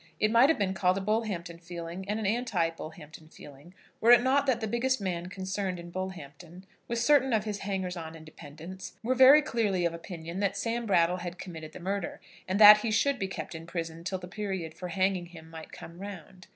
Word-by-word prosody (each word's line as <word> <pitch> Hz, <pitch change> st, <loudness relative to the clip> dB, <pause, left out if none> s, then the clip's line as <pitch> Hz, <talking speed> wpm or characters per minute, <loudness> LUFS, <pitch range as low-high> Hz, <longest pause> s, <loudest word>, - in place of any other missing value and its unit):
It 215 Hz, -, +2 dB
might 235 Hz, +5 st, +6 dB
have 325 Hz, -, +3 dB
been 195 Hz, -2 st, 0 dB
called 185 Hz, 0 st, +1 dB
a -, -, 0 dB
Bullhampton 190 Hz, -5 st, -2 dB
feeling 170 Hz, +2 st, -7 dB
and 210 Hz, +1 st, -1 dB
an 220 Hz, -, -3 dB
anti 200 Hz, -6 st, 0 dB
Bullhampton 160 Hz, -1 st, -11 dB
feeling, 145 Hz, +4 st, -14 dB, 0.2 s
were 230 Hz, -, +2 dB
it 240 Hz, 0 st, +8 dB
not 275 Hz, +2 st, +2 dB
that 250 Hz, -3 st, +2 dB
the 220 Hz, -, -2 dB
biggest 245 Hz, +4 st, 0 dB
man 180 Hz, -3 st, -3 dB
concerned 190 Hz, 0 st, -3 dB
in 170 Hz, 0 st, -10 dB
Bullhampton, 175 Hz, -1 st, -8 dB, 0.2 s
with 235 Hz, -, -2 dB
certain 265 Hz, +1 st, +3 dB
of 215 Hz, -1 st, +2 dB
his 210 Hz, -2 st, -4 dB
hangers 190 Hz, -2 st, -3 dB
on 165 Hz, -1 st, -7 dB
and 160 Hz, -1 st, -12 dB
dependents, 160 Hz, +4 st, -10 dB
were 250 Hz, +3 st, +1 dB
very 265 Hz, +4 st, +8 dB
clearly 205 Hz, -, 0 dB
of 170 Hz, -, 0 dB
opinion 170 Hz, +1 st, -7 dB
that 200 Hz, -1 st, 0 dB
Sam 230 Hz, +2 st, -2 dB
Brattle 175 Hz, -2 st, +3 dB
had 175 Hz, 0 st, -6 dB
committed 160 Hz, -4 st, -8 dB
the -, -, -9 dB
murder, 195 Hz, +1 st, -3 dB, 0.3 s
and 190 Hz, +2 st, -1 dB
that 210 Hz, 0 st, +11 dB
he 225 Hz, -, -2 dB
should 265 Hz, +5 st, +1 dB
be 190 Hz, -, -1 dB
kept 190 Hz, -, -6 dB
in 165 Hz, 0 st, -9 dB
prison 165 Hz, -1 st, -5 dB
till 185 Hz, +2 st, -2 dB
the 180 Hz, -1 st, -9 dB
period 190 Hz, -4 st, -4 dB
for 180 Hz, +3 st, -7 dB
hanging 185 Hz, 0 st, 0 dB
him 165 Hz, -2 st, -13 dB
might 160 Hz, -1 st, -10 dB
come 170 Hz, +1 st, -11 dB
round. 185 Hz, -2 st, -10 dB
185 Hz, 215 wpm, -29 LUFS, 170-215 Hz, 0.3 s, that